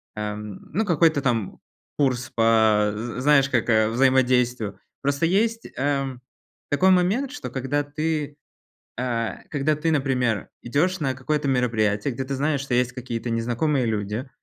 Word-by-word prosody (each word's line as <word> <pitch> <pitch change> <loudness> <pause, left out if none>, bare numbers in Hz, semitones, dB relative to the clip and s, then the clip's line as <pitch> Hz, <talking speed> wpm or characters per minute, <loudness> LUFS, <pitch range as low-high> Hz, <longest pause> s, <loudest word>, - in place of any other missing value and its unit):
ам, 105 -1 -5
ну, 215 +7 0
какой-то 160 -4 +3
там 115 -7 -1 0.4
курс 130 -3 0
по 110 -2 +3
з 115 +3 -5
знаешь, 140 -1 +4
как, 120 -2 0
а, 110 -1 +4
взаимодействию. 125 -3 +2 0.2
Просто 140 +3 +1
есть, 220 +6 +1
эм, 135 -2 -1 0.5
такой 185 +6 +4
момент, 200 +10 +2
что 290 - -6
когда 140 +2 -1
ты, 150 0 -3 0.6
а, 120 -2 -2
когда 150 +1 0
ты, 155 +2 -1
например, 130 -7 0
идешь 165 +9 0
на 135 -3 -1
какое-то 145 +3 -1
мероприятие, 115 -2 +1
где 130 +3 -3
ты 135 +1 -3
знаешь, 145 0 0
что 135 -3 -2
есть 125 0 +2
какие-то 120 -2 -5
незнакомые 120 +4 0
люди, 110 +4 -3
130 Hz, 145 wpm, -24 LUFS, 115-150 Hz, 0.6 s, знаешь